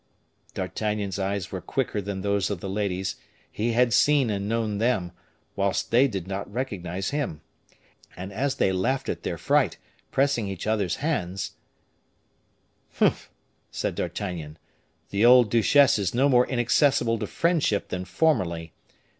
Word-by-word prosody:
D'Artagnan's 105 -3 -2
eyes 95 -1 -2
were - - -4
quicker 105 - -2
than 100 -1 -4
those 100 0 0
of 100 -4 -3
the 95 - -6
ladies; 95 -1 -2 0.3
he 115 +2 -1
had 120 0 +3
seen 140 -4 +4
and 100 0 -2
known 110 -3 -1
them, 105 -7 +1 0.4
whilst 100 -1 -1
they 125 +4 +5
did 95 -8 -4
not 100 +1 -5
recognize 95 -6 -3
him; 140 - -3 0.8
and 95 +2 -7
as 135 +6 -1
they 95 - +2
laughed 95 +9 -1
at - - -3
their - - -3
fright, - - +2 0.3
pressing 135 -6 +1
each 95 -3 -5
other's 105 -5 0
hands, 95 - -2 1.4
"Humph!" - - +1 0.4
said - - -2
D'Artagnan, 80 -6 -4 0.5
"the 100 +2 +1
old 120 -2 +7
duchesse 120 +2 +5
is 100 +2 -1
no 135 +3 +4
more 125 -2 +4
inaccessible 120 -1 +2
to - - -3
friendship 165 - 0
than 90 0 -3
formerly. 90 - 0
105 Hz, 145 wpm, -25 LUFS, 95-125 Hz, 1.4 s, old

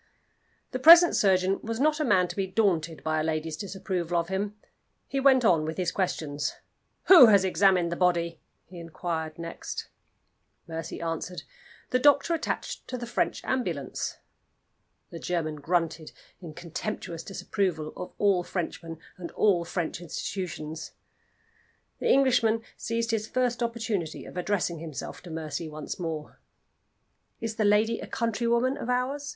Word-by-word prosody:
The 255 - -3
present 335 +5 +9
surgeon 190 -1 +3
was 225 +1 -4
not 305 +2 +2
a - - +1
man 190 -9 +3
to - - -6
be 195 -1 -1
daunted 175 -6 0
by 155 0 0
a - - 0
lady's 155 0 -2
disapproval 185 -3 -3
of 170 +1 -3
him. 200 +2 -2 0.5
He 275 - -2
went 265 -2 +5
on 165 -7 +4
with 160 +1 -4
his 180 -2 0
questions. 150 -6 -2 0.5
"Who 340 -10 +10
has 200 -3 +5
examined 185 -2 +3
the - - -1
body?" 170 -2 +1 0.2
he 180 0 -11
inquired 165 -1 -4
next. 165 0 -6 0.8
Mercy 165 0 -5
answered, 170 +2 -4 0.5
"The 255 - +3
doctor 290 +4 +4
attached 330 - -3
to 255 - -4
the 240 - -5
French 235 - -1
ambulance." 175 - -2 0.9
The 170 - -7
German 165 -4 -2
grunted 165 0 -1 0.3
in 160 -4 -9
contemptuous 170 0 -5
disapproval 185 -5 -2
of 180 - -7
all 195 -3 +3
Frenchmen, 165 -2 -5 0.2
and 175 -2 -6
all 190 -5 +3
French 170 -1 -3
institutions. 165 -2 -5 1.1
The - - 0
Englishman 240 -4 +3
seized 230 0 -2
his 220 -1 -1
first 250 -1 0
opportunity 225 -8 -2
of - - -11
addressing 180 -2 -1
himself 155 -4 -7
to 180 - -11
Mercy 160 0 -4
once 155 +3 -6
more. 160 -3 -5 1.0
"Is 225 -1 -4
the 215 - +2
lady 215 +3 +3
a - - -7
countrywoman 235 +2 0
of 240 - -5
ours?" 265 +3 -1
185 Hz, 145 wpm, -27 LUFS, 165-230 Hz, 1.1 s, Who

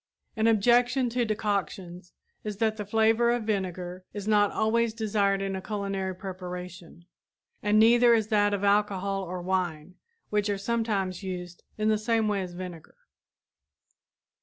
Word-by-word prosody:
An 220 0 +2
objection 245 +4 +3
to 240 0 0
decoctions 195 -4 -3 0.3
is 210 -2 -5
that 220 0 0
the 210 -2 -5
flavor 225 +2 +3
of 240 -1 +1
vinegar 185 -3 -3
is 205 -1 -6
not 205 -1 +4
always 225 +1 +1
desired 200 -3 +1
in 195 0 -2
a 190 - -4
culinary 195 -2 -3
preparation, 180 -2 -8 0.6
and 210 0 +2
neither 235 +2 +6
is 220 -1 0
that 205 -2 +3
of 205 -1 -2
alcohol 200 -1 +1
or 180 -1 -5
wine, 180 -3 -2 0.4
which 210 0 +1
are 200 - 0
sometimes 200 -4 -1
used 180 -2 -6 0.2
in 215 0 +1
the 215 -1 +2
same 225 0 +1
way 205 -2 0
as 180 -1 -6
vinegar. 175 -3 -9
205 Hz, 150 wpm, -27 LUFS, 185-220 Hz, 0.6 s, neither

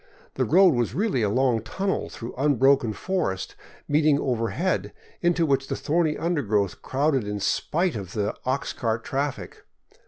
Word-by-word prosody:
The - - 0
road 185 +1 +5
was 120 -2 -1
really 195 - +1
a 105 - +2
long 125 0 +2
tunnel 190 - -2
through 115 +1 -8
unbroken 135 -3 +3
forest 105 - -2 0.3
meeting 150 0 +3
over 115 -5 -1
head, 180 - -1 0.3
into 175 -1 +2
which 135 -2 +1
the - - -2
thorny 150 +3 0
undergrowth 110 - 0
crowded 135 -4 0
in 105 0 -3
spite 170 - 0
of 95 -4 -6
the 105 -1 -1
ox 130 +2 -1
cart 115 -2 -2
traffic. 140 0 -4
135 Hz, 155 wpm, -25 LUFS, 115-160 Hz, 0.3 s, road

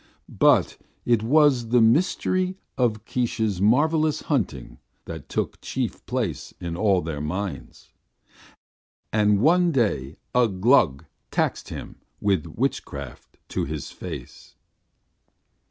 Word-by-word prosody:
But - - +4 0.3
it 120 -3 +3
was 130 -1 +3
the 120 +1 +4
mystery 185 +9 +2 0.2
of 110 -4 0
Keesh's 110 -6 -1
marvellous 155 +7 +2
hunting 95 - -2 0.3
that 80 -3 -8
took - - -3
chief 130 -4 -3
place 115 - -3
in 85 -1 -4
all 95 -1 +2
their 75 -3 -4
minds. 90 +5 -5 1.2
And 105 -2 +3
one 175 +5 +4
day 80 - 0 0.2
Ugh 115 -7 +2
Gluk 90 - +4 0.2
taxed - - -1
him - - -8 0.2
with 100 -4 +1
witchcraft 75 - -4
to - - -1
his 75 0 -5
face. - - -9
110 Hz, 110 wpm, -24 LUFS, 85-130 Hz, 1.2 s, But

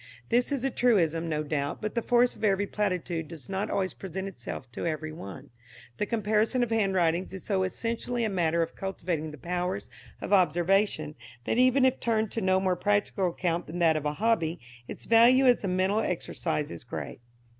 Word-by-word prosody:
This 245 +4 +2
is 275 -3 -1
a 270 - 0
truism, 170 -10 +2
no 155 -1 -1
doubt, 145 -1 -2
but 215 - -4
the 235 - 0
force 245 +1 +3
of - - -13
every 200 -1 +2
platitude 180 -6 -2
does 155 -7 -10
not 195 +3 -2
always 190 -1 -1
present 190 +1 -6
itself 135 -7 -7
to 145 - -4
every 155 -1 -3
one. 145 -4 -9 0.5
The 210 - -1
comparison 220 +2 +1
of 235 - -3
handwritings 190 -4 +1
is 190 - -8
so 195 -3 0
essentially 230 +5 -2
a - - +2
matter 170 -3 +1
of 165 - -7
cultivating 175 -5 -3
the 150 - -10
powers 180 +5 -3 0.3
of - - -3
observation, 175 -2 +2 0.3
that 225 - 0
even 255 +1 +5
if 260 0 +2
turned 220 -2 0
to 225 - -2
no 190 -1 +3
more 190 -1 +1
practical 205 0 +1
account 170 0 -2
than 165 - -6
that 165 -2 +4
of 155 -1 -2
a 150 - -1
hobby 185 -4 0 0.3
its - - -8
value 240 +4 +6
as 245 -3 +4
a - - -1
mental 190 +3 +1
exercise 160 -5 -2
is 85 - -7
great. - - -6
190 Hz, 195 wpm, -28 LUFS, 165-220 Hz, 0.5 s, value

